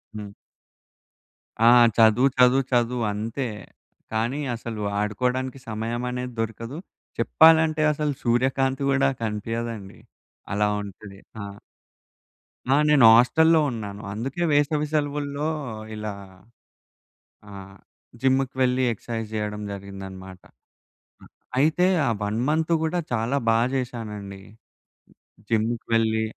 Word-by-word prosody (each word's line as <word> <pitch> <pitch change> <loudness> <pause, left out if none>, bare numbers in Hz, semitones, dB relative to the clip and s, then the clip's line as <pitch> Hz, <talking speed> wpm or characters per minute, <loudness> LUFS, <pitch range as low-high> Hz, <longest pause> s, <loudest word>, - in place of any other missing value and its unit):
హ్మ్. 105 -1 -7 1.3
ఆ! - - +7 0.3
చదువు, 115 +4 +5
చదువు, 125 +2 +5
చదువు. 120 0 +1
అంతే. 115 +6 -4 0.7
కానీ 120 +6 -1 0.2
అసలు 115 -2 -6 0.2
ఆడుకోడానికి 125 +5 -2
సమయం 115 +2 -3
అనేది 125 0 -5
దొరకదు. 115 +5 -4 0.4
చెప్పాలంటే 160 -1 +5
అసలు 150 0 -1
సూర్యకాంతి 130 +3 +1
గూడా 135 0 +3
కనిపియదండి. 110 -1 -4 0.5
అలా 105 +1 +2
ఉంటది. 100 0 -11 0.2
ఆ! - - -5 1.3
ఆ! - - +5
నేను 140 -6 +6
హాస్టల్లో 160 +7 +5
ఉన్నాను. 105 -3 -6
అందుకే 135 +11 -3
వేసవి 145 +1 +2
సెలవుల్లో 145 0 -1 0.5
ఇలా 105 0 -4 1.4
ఆహ్, 95 0 -11 0.5
జిమ్‌కి 135 0 +1
వెళ్లి 130 0 +2
ఎక్స్‌సైజ్ 115 0 -5
జేయడం 105 -1 -3
జరిగిందన్నమాట. 95 -1 -9 0.8
ఆహ్, - - -16 0.3
అయితే 160 +5 +3 0.2
ఆ - - +2
1 105 +2 -2
మంతు 160 +2 +1
గూడా 170 +2 0
చాలా 120 +4 0
బా 115 - +4 0.2
చేశానండి. 105 -6 -5 1.1
జిమ్‌కి 115 +1 0
వెళ్ళి 110 -1 +2
120 Hz, 100 wpm, -24 LUFS, 105-135 Hz, 1.4 s, ఆ